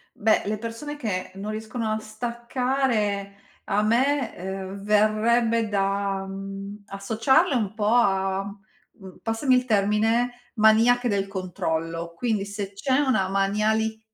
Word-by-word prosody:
Beh, 220 +1 +2
le 210 +1 -1
persone 230 +7 -6
che 200 -8 -3
non 200 +2 -5
riescono 220 +1 -4
a 215 - 0
staccare 235 -2 -1 0.3
a 205 0 +1
me, 250 +4 +2
uhm, 190 +1 -6
verrebbe 220 +2 +2
da, 195 -1 0
mhmm, 195 +1 -7
associarle 225 - +2
un 215 -4 -1
po' 215 -1 -2
a, 195 -4 +2 0.5
uhm, 190 -3 -14
passami 225 +4 +2
il 250 0 +2
termine, 225 +3 +2 0.2
"maniache 230 +3 +4
del 200 -3 0
controllo". 170 -3 -3
Quindi 215 -1 -1
se 200 -1 -5
c'è 260 +6 +1
una 255 -10 +2
maniali 215 +3 +1
215 Hz, 125 wpm, -25 LUFS, 195-235 Hz, 0.5 s, maniache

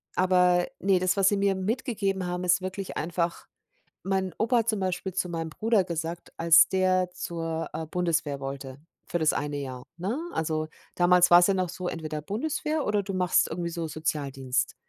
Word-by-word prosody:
aber, 180 -1 +3
ne, 195 -1 +3
das, 185 +1 +1
was 195 -1 +5
sie 205 - +1
mir 200 0 +2
mitgegeben 200 -2 -1
haben, 180 +1 -3
ist 180 +1 +3
wirklich 185 +1 -5
einfach, 170 +1 -2 0.6
mein 190 -1 -1
Opa 235 +3 +2
hat 230 - 0
zum 215 -2 0
Beispiel 185 0 -2
zu 185 - -1
meinem 165 -1 -3
Bruder 215 +3 +1
gesagt, 170 0 -5
als 170 0 +6
der 185 -1 +2
zur, 165 -1 -4
äh, 160 - -4
Bundeswehr 155 -5 -1
wollte 135 -1 -6 0.3
für 175 - -1
das 155 -1 +3
1 145 0 -2
Jahr, 130 -3 -6 0.2
ne? 195 +8 -2 0.2
Also, 155 -1 -1 0.3
damals 175 0 +5
war's 175 +1 +8
ja 195 - +2
noch 185 -2 0
so, 180 0 -5
entweder 155 -2 -5
Bundeswehr 300 - -2
oder 210 -1 +1
du 195 0 -5
machst 180 -1 +2
irgendwie 170 +1 -3
so 165 -1 -3
Sozialdienst. 140 -4 -2
180 Hz, 180 wpm, -27 LUFS, 160-190 Hz, 0.6 s, war's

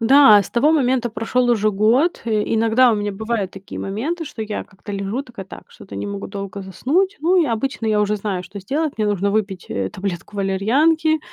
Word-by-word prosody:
Да, 245 -2 +7
с - - -10
того 290 +6 +3
момента 255 -5 +2
прошёл 235 +3 0
уже 215 -2 +2
год, 230 - +2
э. 215 -2 +1
Иногда 230 +2 +4
у - - +2
меня 205 -1 -2
бывают 220 -2 -2
такие 195 0 -9
моменты, 295 - -3
что 225 - -6
я 210 -1 -4
как-то 205 +1 -11
лежу 200 +7 -3
такая: 235 -8 -10
"Так, - - -12
что-то - - -11
не - - -4
могу 200 0 -5
долго 200 0 -6
заснуть". 315 - 0
Ну, 355 +4 +3
и - - 0
обычно 230 0 -2
я 215 -1 +2
уже 210 +1 0
знаю, 195 -3 -3
что 195 +2 -9
сделать: 295 +9 -1
мне 215 - +1
нужно 200 -1 0
выпить, 200 -3 -2
э, 95 -1 -2
таблетку 190 - -6
валерьянки, 285 +12 +2
215 Hz, 205 wpm, -20 LUFS, 200-255 Hz, -, Да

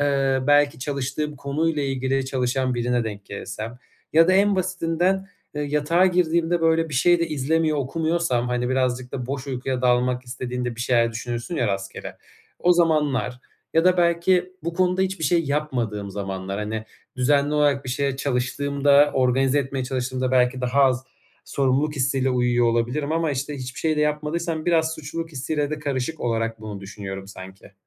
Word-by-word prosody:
ııı, 135 -2 +1
belki 145 0 +4
çalıştığım 140 +2 -3
konuyla 150 +2 -1
ilgili 135 0 -1
çalışan 130 0 0
birine 120 0 0
denk 105 -2 -6
gelirsem 110 +4 -7 0.3
ya 165 +2 +6
da - - +5
en 200 +1 +4
basitinden, 185 +1 0 0.3
ııı, 150 - -1
yatağa 150 +5 +2
girdiğimde 170 -1 +1
böyle 165 0 +2
bir 145 - -6
şey 175 +6 +4
de 170 - 0
izlemiyor, 155 +1 +1
okumuyorsam, 155 -3 0
hani, 125 0 -1
birazcık 130 -1 -1
da 125 -2 -4
boş 135 0 -4
uykuya 130 -1 -3
dalmak 125 0 +2
istediğinde 125 -1 -4
bir - - -6
şeyler 115 -2 +2
düşünürsün 120 +7 -4
ya 120 - +1
rastgele, 95 0 -5 0.4
o 180 - +4
zamanlar 150 -7 +1 0.3
ya 165 +1 +4
da 185 0 +5
belki 175 +1 +2
bu 170 +1 -3
konuda 185 +1 +2
hiçbir 190 -4 -2
şey 165 +2 +2
yapmadığım 120 -9 -2
zamanlar, 95 0 -4
hani, 110 +1 -3 0.3
düzenli 140 +3 +2
olarak 145 -2 +2
bir 125 - -4
şeye 140 0 -1
çalıştığımda, 140 +2 +2
organize 130 +2 +2
etmeye 135 -1 -2
çalıştığımda 130 0 -2
belki 125 0 +2
daha 130 +3 +2
az 130 -1 +1 0.4
sorumluluk 140 +2 0
hissiyle 135 0 +1
uyuyor 120 -1 +2
olabilirim 125 +6 0
ama, 165 -2 +1
işte, 140 +2 -3
hiçbir 130 0 -7
şey 155 -1 +1
de - - +1
yapmadıysam 155 +2 -1
biraz 160 -2 +2
suçluluk 165 +2 -6
hissiyle 145 +2 -2
de 155 - -3
karışık 145 +1 -3
olarak 115 -1 -1
bunu 105 -2 -7
düşünüyorum 95 -1 -7
sanki. 95 0 -12
135 Hz, 165 wpm, -23 LUFS, 125-160 Hz, 0.4 s, ya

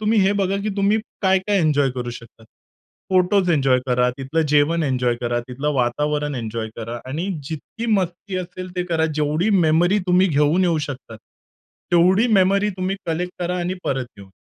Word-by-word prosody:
तुम्ही 215 +1 +2
हे 195 +1 +3
बघा, 195 0 0
की 215 - -2
तुम्ही 200 +2 +2 0.2
काय-काय 190 +1 +2
एन्जॉय 145 -4 +2
करू 125 -1 -5
शकता? 115 -1 -12 0.7
फोटोस 185 0 +3
एन्जॉय 135 -5 +3
करा, 125 0 +2
तिथलं 135 +5 -1
जेवण 150 +3 +3
एन्जॉय 125 -4 +1
करा, 120 0 -1
तिथलं 140 +4 -2
वातावरण 145 +4 0
एन्जॉय 115 -2 -4
करा 115 +1 -5
आणि 160 +7 -3 0.2
जितकी 165 +9 -6
मस्ती 185 -2 -1
असेल 180 0 -6
ते 180 - +1
करा. 165 -2 0
जेवढी 155 +6 0 0.2
मेमरी 175 +6 +3
तुम्ही 180 +1 +4
घेऊन 150 +4 +2
येऊ 170 -3 +2
शकता. 130 -5 -8 0.8
तेवढी 185 +6 +4
मेमरी 200 +1 +3
तुम्ही 185 +1 -2
कलेक्ट 175 +2 -2
करा 180 +1 -1
आणि 180 +1 -2
परत 135 -1 -1
घेऊन 100 -1 -13
165 Hz, 165 wpm, -21 LUFS, 135-185 Hz, 0.8 s, तुम्ही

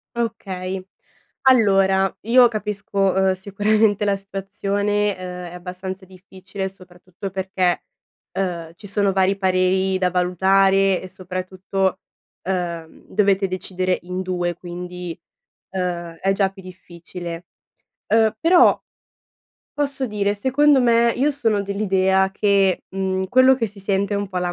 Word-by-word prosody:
Okay. 190 -5 -4 0.6
Allora 195 -6 +4
io 245 +2 +6
capisco, 210 -2 -5
uhm, 190 0 +2
sicuramente 205 +2 +1
la 200 -1 +2
situazione, 200 +1 -1
uhm, 180 -1 -7
è - - -11
abbastanza 185 +2 -7
difficile, 190 +1 -7
soprattutto 185 0 -10
perché, 190 -1 -1 0.5
uhm, 170 -4 -3
ci 205 +3 -11
sono 200 -1 +1
vari 190 +1 +2
pareri 190 0 +1
da 180 -1 +2
valutare 190 +2 +3
e 185 - -8
soprattutto, 185 +1 -3 0.4
uhm, 175 -3 -4
dovete 195 -2 +2
decidere 185 0 -2
in 180 +1 -4
2. 175 -2 -2
Quindi, 180 0 -7 0.6
uhm, 175 -2 -3
è 195 - +2
già 195 -1 +1
più 195 0 -14
difficile. 175 -1 -9 0.7
Uhm, 225 -1 +4
però, 350 +2 +5 0.9
posso 275 -2 -2
dire, 205 -1 -1
secondo 270 +5 +3
me 235 -1 +4
io 285 +4 +2
sono 225 -7 0
dell'idea 190 -1 +1
che, 195 -2 +2
mhmm, 190 0 -1
quello 255 +4 +6
che 230 -3 -1
si 205 0 -13
sente 195 +1 0
un 200 0 -2
po' 185 -1 -3
la 175 0 -1
190 Hz, 125 wpm, -21 LUFS, 185-205 Hz, 0.9 s, io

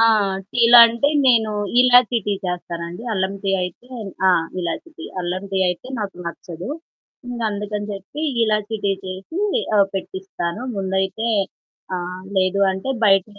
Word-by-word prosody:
ఆ! - - +7 0.5
టీలంటే 235 +2 +7 0.2
నేను 225 -4 +4 0.3
ఇలాచీ 250 -1 +5
టీ 205 - +1
చేస్తానండి. 175 +1 -5
అల్లంటీ 195 0 -1
అయితే 180 +7 -7 0.4
ఆ! - - +7 0.3
ఇలాచీ 180 - -4
టీ. 335 - -7 0.2
అల్లంటీ 185 +2 -3
అయితే 180 +8 -4
నాకు 200 -3 -4
నచ్చదు. 170 +1 -7 0.6
ఇంకందుకని 210 -3 -3
చెప్పి 200 +10 -7 0.2
ఇలాచీ 215 0 0
టీ 200 - +3
చేసి 190 - -5 0.4
ఆహ్, 200 -1 +5
పెట్టిస్తాను. 190 0 -4
ముందైతే. 190 +3 -1 0.7
ఆహ్, 180 +1 -6
లేదు 190 +1 +2
అంటే 190 +7 -5 0.2
బయట 195 -2 +5
195 Hz, 120 wpm, -21 LUFS, 185-230 Hz, 0.7 s, ఆ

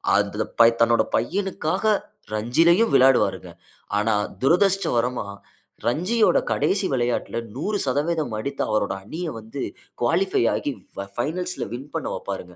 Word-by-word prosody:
அதுல - - 0
ப 115 - +9
தன்னோட 115 0 +4
பையனுக்காக 195 +1 0 0.4
ரஞ்சியிலயும் 165 - +3
விளையாடுவாருங்க. 130 0 +3 0.5
ஆனா, 110 +1 +1 0.3
துரதிருஷ்டவசமா 135 - +2 0.6
ரஞ்சியோட 185 - +3
கடைசி 195 0 +1
விளையாட்ல, 120 -2 -1 0.2
100% 150 - -1
அடித்த 140 +5 -4
அவரோட 105 -2 0
அணிய 165 - -5
வந்து, 110 +5 -6 0.4
குவாலிஃபை 170 +6 +2
ஆக்கி, 145 - -2 0.2
ஃப 100 - -4
ஃபைனல்ஸ் 180 +8 -2
ல - - -5
வின் 135 +4 -7
பண்ண 165 - -2
வப்பாருங்க 90 -2 -6
140 Hz, 115 wpm, -23 LUFS, 120-180 Hz, 0.6 s, ப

